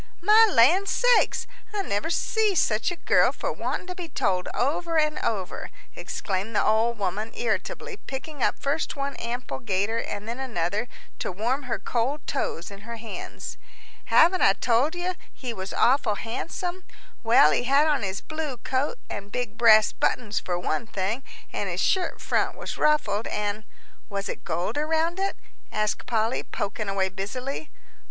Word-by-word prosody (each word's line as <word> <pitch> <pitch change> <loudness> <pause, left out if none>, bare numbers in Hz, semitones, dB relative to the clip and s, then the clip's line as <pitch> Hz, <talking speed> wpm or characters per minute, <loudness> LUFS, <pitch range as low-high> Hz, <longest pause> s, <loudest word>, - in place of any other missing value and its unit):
"My 430 +4 +7
land 340 +12 +5
sakes! - - +3 0.3
I 400 - 0
never 205 - -1
see 425 +4 +1
such 220 -8 +2
a 350 - -3
girl - - +4
for - - -3
wanting - - -3
to 365 - -5
be 355 -2 -7
told 185 -8 0
over 325 +6 0
and 305 -1 +2
over," 195 -5 -2 0.3
exclaimed 200 +2 -3
the - - +3
old 225 +2 +3
woman, 205 +3 -2
irritably, 400 - -2
picking 275 +1 -6
up - - +2
first 285 +4 -1
one 280 0 -3
ample 240 +2 -4
gaiter 205 +1 0
and 205 -1 -5
then 235 +3 -4
another 215 -3 -1 0.3
to - - -2
warm 250 +8 -1
her - - 0
cold 260 +5 -1
toes 190 -10 -2
in 200 - -9
her 235 +3 -7
hands. 225 0 -7 0.5
"Haven't 360 +3 +5
I 195 - +6
told 245 - +2
you 355 +1 -1 0.2
he 250 -3 -5
was 190 -2 -5
awful 245 -4 +3
handsome? 350 - -4 0.4
Well, 225 -10 +6
he 245 - +1
had 280 +4 +4
on 295 -4 +2
his 195 -1 -3
blue 310 -5 -4
coat 265 - -1
and 200 +1 -6
big 240 -3 -3
brass 220 -3 +6
buttons 220 -4 0
for 175 -1 -2
one 175 +3 -2
thing, 210 +4 -2 0.3
an' - - -2
his - - -3
shirt 375 -2 +1
front - - 0
was - - -5
ruffled. 300 -8 +2
And 210 0 -2 0.2
" - - -32
"Was 200 0 -3
it - - -5
gold 175 - -1
around 320 +3 +1
it?" 390 0 0 0.4
asked 215 0 -1
Polly, 225 0 +1
poking 205 +1 -4
away 195 -1 +1
busily. 250 +10 -5
240 Hz, 170 wpm, -26 LUFS, 205-305 Hz, 0.5 s, My